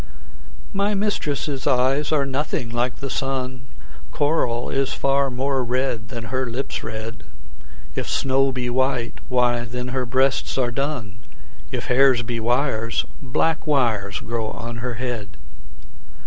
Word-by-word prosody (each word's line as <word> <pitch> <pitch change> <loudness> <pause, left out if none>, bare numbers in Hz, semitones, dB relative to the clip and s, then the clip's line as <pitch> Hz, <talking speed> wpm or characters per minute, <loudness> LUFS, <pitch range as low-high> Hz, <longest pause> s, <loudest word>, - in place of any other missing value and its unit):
MY 200 +1 +1
mistress' 150 -9 -1
eyes 135 +2 +3
are 145 -3 +3
nothing 135 -2 -1
like 120 +1 0
the 135 +3 -5
sun; 130 -1 -2 0.4
Coral 135 -6 +1
is 135 -1 +1
far 140 0 +2
more 130 +1 0
red 125 -2 0
than 115 +1 -6
her 130 0 +1
lips' 125 +4 -3
red; 110 +1 -5 0.7
If - - -3
snow 135 0 +3
be 125 -1 -2
white, 130 -1 0
why 125 -1 +3
then 125 +1 -4
her 130 -1 -1
breasts 130 +2 +2
are 125 -2 +2
dun; 125 -7 -2 0.5
If - - -3
hairs 130 -1 +5
be 120 0 -2
wires, 115 -1 +1 0.2
black 150 +5 0
wires 110 - +1
grow 115 -1 -2
on 115 0 -5
her 120 +1 -3
head. 115 -5 -4
125 Hz, 135 wpm, -23 LUFS, 120-135 Hz, 0.7 s, hairs